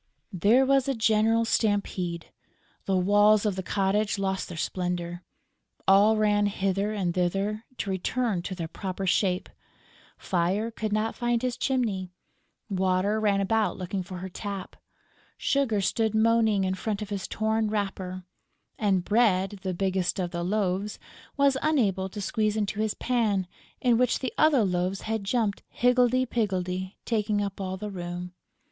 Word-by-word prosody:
There 215 +9 +4
was 275 0 +3
a 275 - 0
general 225 +1 +3
stampede. 200 -6 -1 0.5
The 190 -1 +1
walls 205 +3 +4
of 205 -3 +1
the 190 - -3
cottage 200 +2 0
lost 190 -1 -1
their 175 - -7
splendour. 175 0 -3 0.7
All 205 +3 +6
ran 205 -1 +3
hither 195 +1 -1
and 190 -5 -1
thither, 195 +5 -1
to 200 - -3
return 200 +1 -1
to 185 +2 -5
their 165 -2 -4
proper 190 +2 -5
shape: 185 0 +1 0.7
Fire 190 +6 0
could 220 -1 -4
not 215 +1 0
find 240 0 -1
his 250 -1 0
chimney; 220 -9 -1 0.6
Water 190 +1 +1
ran 205 -2 +2
about 220 +2 +1
looking 185 +1 -3
for 185 0 -7
her 185 +1 -5
tap; 200 0 -6 0.6
Sugar 255 -7 +1
stood 220 +2 0
moaning 220 -2 +3
in 185 0 0
front 210 +2 -3
of 205 - -9
his 195 -2 -3
torn 220 0 0
wrapper; 190 -3 -3 0.6
and 195 -4 +1
Bread, 205 -3 +2
the 185 -2 -3
biggest 190 -1 0
of 180 -2 -2
the 170 - -3
loaves, 195 +1 -1 0.4
was 280 -1 +4
unable 205 -11 +1
to 205 +2 -6
squeeze 215 +1 0
into 205 -1 -2
his 215 -1 0
pan, 220 -6 0 0.3
in 240 -2 +3
which 250 -1 +3
the 260 - -4
other 300 -6 +4
loaves 185 0 -1
had 220 -1 -2
jumped 210 -1 0
higgledy 250 +1 +3
piggledy, 190 -5 -2
taking 210 -2 0
up 200 -1 -3
all 190 0 -3
the 210 +2 -5
room. 175 -1 -6
205 Hz, 155 wpm, -27 LUFS, 185-220 Hz, 0.7 s, All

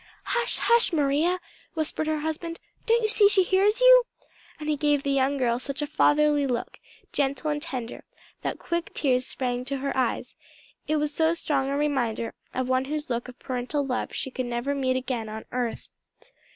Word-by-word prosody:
"Hush, 480 0 -1
hush, 470 -2 +3
Maria!" 310 +4 +2 0.4
whispered 315 0 -2
her 310 -1 0
husband, 325 +2 -4 0.3
"don't 460 0 +3
you - - +3
see 420 -2 +5
she 395 -2 +4
hears 395 +5 +3
you?" - - +8 0.5
and 305 - -6
he 305 - +2
gave 290 -1 +1
the 280 - 0
young 275 +1 +2
girl 240 -2 +1
such 275 +2 -5
a - - 0
fatherly 295 -1 +3
look, 245 -2 -3 0.3
gentle 280 +2 0
and 295 0 -2
tender, 255 -7 -5 0.4
that - - -3
quick 340 -1 -3
tears 255 -3 +1
sprang 250 -1 -2
to 275 +1 -2
her 275 +1 -3
eyes: 255 -3 -1 0.5
it 310 - +1
was 300 -1 0
so 320 +1 +2
strong 280 -5 0
a 280 - 0
reminder 245 -6 0 0.2
of 255 0 -2
one 255 0 +1
whose 300 0 -4
look 240 +1 -2
of 250 0 -11
parental 260 +3 -2
love 255 -2 -2
she 265 - -4
should 255 -1 -2
never 240 +4 -1
meet 260 -2 0
again 250 -4 -3
on 220 +1 -7
earth. 245 -2 -3
285 Hz, 190 wpm, -26 LUFS, 255-315 Hz, 0.5 s, you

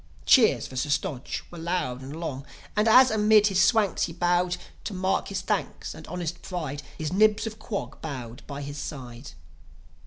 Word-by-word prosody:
Cheers 220 - +5
for 130 - -9
Sir 130 +3 -1
Stodge 140 -2 -2
were 175 - -9
long 165 -7 -2
and 140 +4 -7
loud; 140 -5 -4 0.3
And, 210 +1 +2
as 255 +3 +7
amid 215 -1 +5
his 190 -3 +4
Swanks 205 -2 +3
he 165 - -7
bowed, 175 +1 +1 0.3
To 205 - -4
mark 185 +1 0
his - - -3
thanks - - -2
and - - -11
honest 175 -1 -4
pride, 155 -6 -4 0.2
His 155 +2 -3
Nibs 215 +2 +4
of 220 0 -6
Quog 215 -2 -5
bowed 125 -5 -6
by 140 0 -6
his 145 +1 -6
side. 130 -2 -7
175 Hz, 180 wpm, -26 LUFS, 140-205 Hz, 0.3 s, as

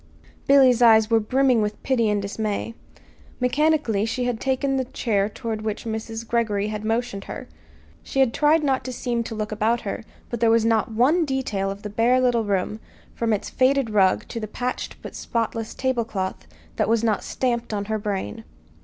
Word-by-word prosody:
Billy's 260 -3 +6
eyes 220 -1 +6
were 225 - +5
brimming 255 +2 +2
with 210 0 -3
pity 235 -5 +2
and 210 0 +1
dismay. 210 +2 -3 0.7
Mechanically 255 -4 +2
she 230 +3 -1
had 245 -2 -1
taken 270 +1 0
the 260 - 0
chair 210 -5 0
toward 220 0 -4
which 215 0 -4
Mrs. 225 0 -5
Greggory 215 -3 0
had 210 0 -4
motioned 225 -3 -2
her. - - -7 0.5
She 270 - -4
had 260 -4 +4
tried 305 +1 +3
not 270 -2 +1
to 255 - -4
seem 240 -1 -2
to 225 - -5
look 215 0 -3
about 220 +2 +1
her; 205 +1 -5 0.3
but 235 - -3
there 230 0 +4
was 225 0 +4
not 225 0 +2
one 265 +10 +3
detail 260 -9 -1
of 195 +1 -7
the 210 - -4
bare 235 +4 +3
little 245 -3 +2
room, 200 +1 -1 0.3
from 230 -1 -1
its 210 - -1
faded 260 -2 +2
rug 195 -3 +3
to 230 - -4
the 215 - -4
patched 250 +4 -4
but - - -7
spotless 225 -1 -3
tablecloth, 230 -7 -2 0.3
that - - +1
was 230 0 +2
not 220 -3 +1
stamped 240 -3 -2
on 205 -1 -2
her 215 +1 -2
brain. 205 +2 -4
230 Hz, 190 wpm, -23 LUFS, 215-250 Hz, 0.7 s, Billy's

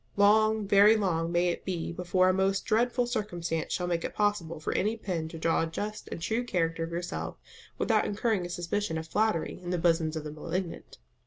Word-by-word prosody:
Long, 215 +1 +4
very 205 +2 +7
long 170 -5 0
may 175 +1 +2
it 170 - -3
be 175 -3 -3
before 180 +1 +2
a 185 - +4
most 195 +1 +1
dreadful 245 +3 +2
circumstance 175 -9 -3
shall 180 - -1
make 170 -1 -1
it - - -4
possible 205 -7 0
for 155 - -2
any 215 +4 0
pen 175 -7 -3
to 165 - -8
draw 165 +1 +1
a 165 - 0
just 210 +6 -5
and - - -4
true 225 +8 -1
character 165 -7 -1
of 165 - -4
yourself 175 +1 -4 0.4
without - - +2
incurring 210 -2 0
a 175 - -5
suspicion 175 +1 -2
of 160 0 -5
flattery 215 -2 0
in 175 - -6
the 180 - 0
bosoms 165 -2 +2
of 155 - -3
the 150 - -6
malignant. 170 +3 -5
180 Hz, 210 wpm, -29 LUFS, 165-210 Hz, 0.4 s, very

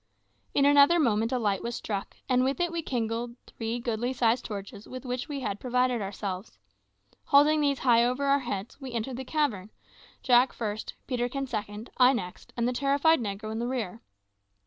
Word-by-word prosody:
In 280 - +4
another 285 +4 +6
moment 225 -5 +2
a 255 - +1
light 205 -5 0
was 235 0 -4
struck, 200 -2 -5
and 255 -1 +3
with 270 +4 0
it 350 -1 +1
we 335 -1 -2
kindled 235 -3 -2
three 225 +1 -4
goodly 240 +1 -2
sized 240 -1 +1
torches 200 0 -7
with 255 +1 -8
which 250 +2 -3
we 280 -2 -4
had 205 -4 -3
provided 250 -1 +1
ourselves. 195 - -5 0.7
Holding 300 +2 +5
these 280 -2 +2
high 235 -3 +4
over 250 +3 0
our 280 0 +4
heads, 235 0 -5
we 260 -2 -7
entered 235 +2 -3
the 265 - -4
cavern 255 -10 -1 0.5
Jack 250 0 +5
first, 215 -1 -4
Peterkin 250 +2 -2
second, 215 -2 -5
I 255 +1 +6
next, 180 -8 -6
and 235 0 +1
the 250 - 0
terrified 280 +4 +3
negro 215 -1 -4
in 220 - -3
rear. 230 -5 -3
245 Hz, 180 wpm, -28 LUFS, 220-270 Hz, 0.7 s, another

